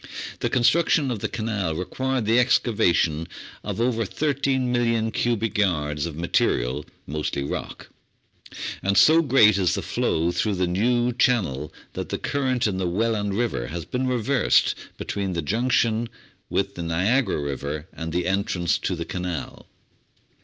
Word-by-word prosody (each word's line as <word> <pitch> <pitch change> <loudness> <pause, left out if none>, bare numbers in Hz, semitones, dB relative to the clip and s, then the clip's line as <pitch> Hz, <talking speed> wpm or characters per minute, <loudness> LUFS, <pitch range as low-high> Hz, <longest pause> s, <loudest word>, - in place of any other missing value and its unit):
The - - 0
construction 135 +2 +3
of 115 - -3
the - - -2
canal 105 -7 -2
required 130 +7 -2
the 115 +3 +4
excava 115 -5 +3
tion 80 0 0 0.4
of - - -4
over 115 -1 +1
13,000,000 125 -3 0
cubic 115 -3 0
yards 75 -6 0
of 80 - -7
material, 75 -4 0 0.2
mostly 75 -1 -3
rock; 70 - -5 0.9
and 100 0 +1
so 160 +2 +7
great 110 - +5
is 90 -2 +2
the - - -3
flow 85 +2 0
through 105 +3 0
the 90 0 +1
new 120 +7 +1
channel 95 - +1 0.2
that - - -5
the - - -2
current 130 -4 0
in 100 -4 0
the 95 -1 -1
Welland 105 +1 0
River 110 - -1
has 85 0 -5
been 130 +1 -2
reversed 125 +1 +2 0.2
beween 95 -3 -3
the 85 - -1
junction 115 - +1 0.4
with - - 0
the - - -6
Niagara 95 - +1
River 70 +2 -4
and 80 0 -5
the 90 +2 -1
entrance 95 -2 0
to 95 - -2
the 85 -1 -4
Canal. 90 -3 -5
105 Hz, 150 wpm, -24 LUFS, 85-120 Hz, 0.9 s, so